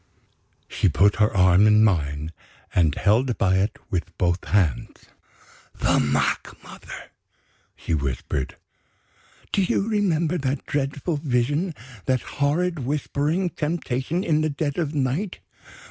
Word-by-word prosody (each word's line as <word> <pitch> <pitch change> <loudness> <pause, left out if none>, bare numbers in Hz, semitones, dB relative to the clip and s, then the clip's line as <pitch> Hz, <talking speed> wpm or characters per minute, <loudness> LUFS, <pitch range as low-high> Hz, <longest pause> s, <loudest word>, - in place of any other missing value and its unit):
She - - +1
put 100 +1 +3
her 105 0 +3
arm 95 +2 +5
in 105 0 +5
mine, 75 -6 0 0.4
and 80 -5 +3
held 115 +5 +2
by 95 -1 +2
it 100 +3 0
with 90 -2 -3
both 90 0 0
hands. 90 -10 0 0.7
"The - - +2
mock 75 0 0
mother!" - - -11 0.6
she - - -4
whispered. 70 -2 -2 1.0
"Do 200 - +2
you 195 +2 +1
remember 180 -6 +1
that 135 0 -2
dreadful 145 +3 -2
Vision, 145 +5 0 0.3
that 130 -2 +2 0.2
horrid 165 +4 +1
whispering 150 +6 -1
temptation 155 +1 -2
in 155 -2 +2
the 155 - +1
dead 145 +1 -2
of 155 -2 -2
night? 145 +8 -1
130 Hz, 125 wpm, -24 LUFS, 95-155 Hz, 1.0 s, arm